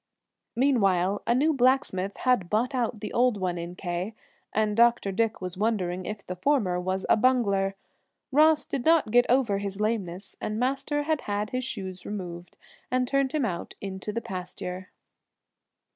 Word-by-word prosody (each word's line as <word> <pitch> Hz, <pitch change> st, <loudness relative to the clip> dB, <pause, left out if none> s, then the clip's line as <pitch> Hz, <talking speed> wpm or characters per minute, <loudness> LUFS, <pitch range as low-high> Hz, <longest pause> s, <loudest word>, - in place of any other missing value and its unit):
Meanwhile 200 Hz, -7 st, +2 dB
a 235 Hz, -, +3 dB
new 305 Hz, +5 st, +3 dB
blacksmith 245 Hz, -8 st, +1 dB
had 250 Hz, -9 st, +1 dB
bought 235 Hz, +7 st, +1 dB
out 240 Hz, -4 st, -1 dB
the -, -, -5 dB
old 245 Hz, -3 st, +3 dB
one 180 Hz, -2 st, -1 dB
in 170 Hz, +1 st, -6 dB
K 180 Hz, +4 st, -4 dB, 0.4 s
and 215 Hz, -1 st, +1 dB
Dr. 235 Hz, -3 st, +4 dB
Dick 225 Hz, +2 st, 0 dB
was 180 Hz, 0 st, -5 dB
wondering 185 Hz, -5 st, -1 dB
if 210 Hz, -1 st, -6 dB
the 180 Hz, -, -5 dB
former 205 Hz, -6 st, +1 dB
was 185 Hz, +1 st, -2 dB
a -, -, +5 dB
bungler. 205 Hz, -5 st, +2 dB, 0.6 s
Ross 305 Hz, +2 st, +5 dB
did 270 Hz, -, -3 dB
not 320 Hz, -8 st, +4 dB
get 245 Hz, +1 st, +5 dB
over 235 Hz, -6 st, +3 dB
his 200 Hz, 0 st, -5 dB
lameness, 200 Hz, -4 st, -2 dB
and 215 Hz, -, -2 dB
Master 275 Hz, +3 st, 0 dB
had 310 Hz, -1 st, 0 dB
had 205 Hz, +1 st, -2 dB
his 255 Hz, 0 st, -1 dB
shoes 190 Hz, -7 st, -5 dB
removed 175 Hz, -4 st, -7 dB, 0.3 s
and 250 Hz, 0 st, +1 dB
turned 275 Hz, 0 st, +1 dB
him 300 Hz, -5 st, +1 dB
out 175 Hz, -5 st, -4 dB
into 195 Hz, +1 st, -5 dB
the 230 Hz, +2 st, -3 dB
pasture. 185 Hz, -3 st, -6 dB
210 Hz, 165 wpm, -27 LUFS, 185-255 Hz, 0.6 s, a